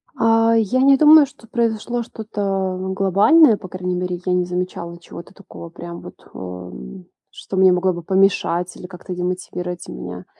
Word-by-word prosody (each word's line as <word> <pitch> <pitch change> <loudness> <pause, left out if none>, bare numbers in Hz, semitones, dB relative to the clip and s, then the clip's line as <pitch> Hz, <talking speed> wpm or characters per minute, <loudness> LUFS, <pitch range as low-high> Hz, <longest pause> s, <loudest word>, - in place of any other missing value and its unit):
А, 225 -1 +3
я 230 +4 +1
не 275 0 +5
думаю, 305 0 +7
что 265 -4 -18
произошло 235 +1 -2
что-то, 195 -4 -3
ну, 190 0 -4
глобальное, 210 - +4
по 185 - -10
крайней 180 0 -4
мере. 180 -1 -3
Я 180 - +1
не 180 0 +1
замечала 180 -1 -5
чего-то 170 +2 -12
такого 185 -3 -12
прям 170 0 -9
вот, - - -14
ам, 90 -5 -9 0.3
что 190 - -7
мне 190 -1 +6
могло 180 +1 +1
бы 175 - -7
помешать 180 -2 +1
или 180 - -9
как-то 180 0 -9
демотивировать 180 0 -5
меня. 90 0 -8
185 Hz, 165 wpm, -20 LUFS, 175-220 Hz, 0.3 s, думаю